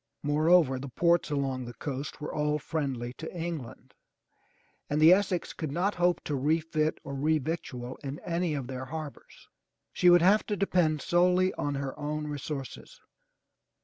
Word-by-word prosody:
Moreover 150 -2 +4
the 140 +1 -6
ports 170 +7 +2
along 135 -3 -1
the 120 0 -9
coast 140 -1 -5
were 150 - -5
all 150 0 +1
friendly 135 -6 -3
to 160 - -6
England, 165 -8 -6 1.0
and 150 - 0
the 160 +3 +8
Essex 185 -2 0
could 155 -4 -4
not 180 +7 0
hope 175 0 +1
to 150 - -3
refit 155 +2 0
or 140 - -6
re 155 +3 +2
victual 130 -5 -5
in 140 0 -6
any 170 -2 -1
of 135 -3 -3
their 130 0 -6
harbors. 155 +1 -9 0.5
She 180 - +4
would 175 -1 +6
have 205 +4 +5
to 210 - -1
depend 175 -6 +1
solely 180 +1 +3
on 145 -1 -2
her 135 -1 -4
own 150 +1 -3
resources. 145 -3 -6
150 Hz, 160 wpm, -29 LUFS, 140-170 Hz, 1.0 s, the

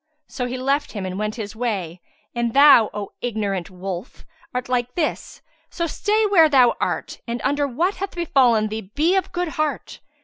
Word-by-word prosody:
So 250 - -4
he 250 +1 -4
left 275 +3 -1
him 200 -4 -4
and 185 +1 -4
went 215 0 -2
his 215 -2 -6
way. 195 -8 -3 0.3
And 235 0 -2
thou, 275 -6 +7
O 205 -1 -6
ignorant 205 -6 -2
wolf, 185 +2 -7 0.3
art 250 +1 -3
like 250 -1 -1
this; 330 -3 -3 0.3
so 340 - -2
stay 425 +6 +1
where 345 -6 +5
thou 255 -4 +5
art - - -2
and 235 +1 -3
under 285 0 +1
what 340 +10 -1
hath 390 0 -5
befallen 250 -10 +3
thee 215 -3 -6
be 325 +6 +3
of 380 - 0
good 355 -1 -2
heart!" 305 -1 -3
245 Hz, 180 wpm, -22 LUFS, 215-305 Hz, 0.3 s, thou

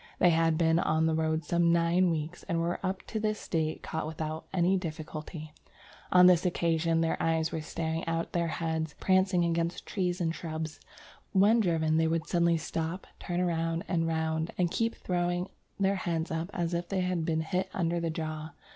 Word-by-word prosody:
"They 175 - +5
had 165 -1 +3
been 165 0 +3
on 160 -1 +2
the 160 - +2
road 160 0 0
some 170 +1 +3
nine 170 +2 +3
weeks, 160 +1 -3
and 170 -2 +1
were 170 +1 -1
up 190 0 -2
to 220 - -3
this 215 0 -2
date 160 -2 -1
caught 160 -1 -3
without 155 0 -5
any 185 +1 +3
difficulty. 155 -2 -6 0.6
On 180 0 +8
this 180 -1 +6
occasion... 165 -2 +1
their 165 0 0
eyes 160 -1 +1
were 160 - -3
staring 160 +1 -3
out 165 0 0
of - - -27
their 170 -1 0
heads, 165 0 -2
and 160 0 -1
they 150 - -18
were - - -34
prancing 185 -2 +3
against 170 0 -1
trees 180 -2 -1
and 165 -2 0
shrubs.... 160 -2 -5 0.5
When 205 +4 +5
driven 160 -5 +2
they 160 0 +3
would 165 0 0
suddenly 170 -1 +2
stop, 165 +3 -3
turn 180 0 -1
round 165 -1 -1
and 165 -3 +1
round, 160 0 -1
and 175 -2 +1
keep 230 0 0
throwing 175 0 -1 0.3
their 195 0 +2
heads 165 -3 -2
up 165 +2 -2
as 175 -3 -2
if 170 0 -2
they 190 -2 0
had 180 -2 0
been 160 -1 0
hit 185 +3 -1
under 170 -1 0
the 170 -1 -1
jaw.... 155 -1 -4
165 Hz, 200 wpm, -30 LUFS, 160-180 Hz, 0.6 s, On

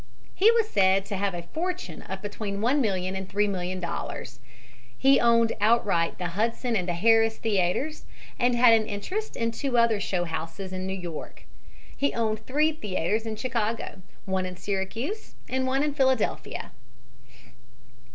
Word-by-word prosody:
He 420 - +5
was 460 -2 +3
said 195 - +3
to 200 - -4
have 195 -1 -1
a 170 - -5
fortune 330 - -4
of 190 +1 -7
between 205 -1 -4
$1,000,000 205 -6 +1
and 190 0 -5
$3,000,000. 185 -9 -2 0.6
He 270 0 +5
owned 230 -1 +4
outright 205 -6 +2
the 180 -1 -3
Hudson 230 +6 -1
and 180 -3 0
the 175 - -1
Harris 225 +3 +4
theaters 220 - 0 0.3
and 245 0 +3
had 240 -1 +7
an 220 -1 +3
interest 370 - -4
in 230 0 0
two 250 +1 -1
other 230 -3 +4
show 185 -2 -1
houses 165 +3 -5
in 185 0 -3
New 190 0 -3
York. 175 -4 -7 0.5
He 280 - 0
owned 220 -1 -1
three 300 +4 +3
theaters 215 - -2
in 220 - -3
Chicago, 225 -3 -2 0.2
one 190 -1 -1
in 180 -1 -8
Syracuse 215 - -4
and 260 0 -1
one 270 +2 +1
in 295 -1 0
Philadelphia. 260 -5 0
215 Hz, 150 wpm, -27 LUFS, 190-245 Hz, 0.6 s, had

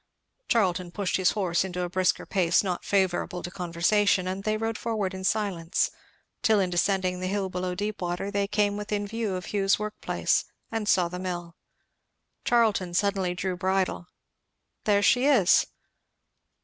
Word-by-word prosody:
Charlton 185 -5 +1
pushed 190 +1 -1
his 185 -1 +2
horse 185 -5 +1
into 180 -1 -3
a - - -1
brisker 185 0 +1
pace 180 -2 +2
not 180 -3 -2
favourable 185 -2 0
to 175 - -5
conversation; 180 +2 +1
and 190 +1 -3
they 215 +1 0
rode 225 0 -2
forward 215 -5 -2
in 190 0 -6
silence, 190 -5 0 0.5
till 220 -4 +4
in 185 -2 0
descending 185 0 +1
the 185 - -2
hill 195 0 -1
below 180 0 -3
Deepwater 195 -2 -3
they 200 -1 0
came 205 0 +1
within 210 0 -2
view 215 -2 -2
of 180 +2 -6
Hugh's 195 -1 +3
workplace, 210 0 -1 0.3
the 225 -2 -2
saw 180 -4 +4
mill. 175 -2 -5 0.9
Charlton 215 -7 +2
suddenly 195 -2 +1
drew 185 0 -2
bridle. 185 -1 -1 0.8
"There 205 -1 +3
she 245 +7 +4
is." 230 -11 +5
190 Hz, 150 wpm, -27 LUFS, 180-210 Hz, 0.9 s, is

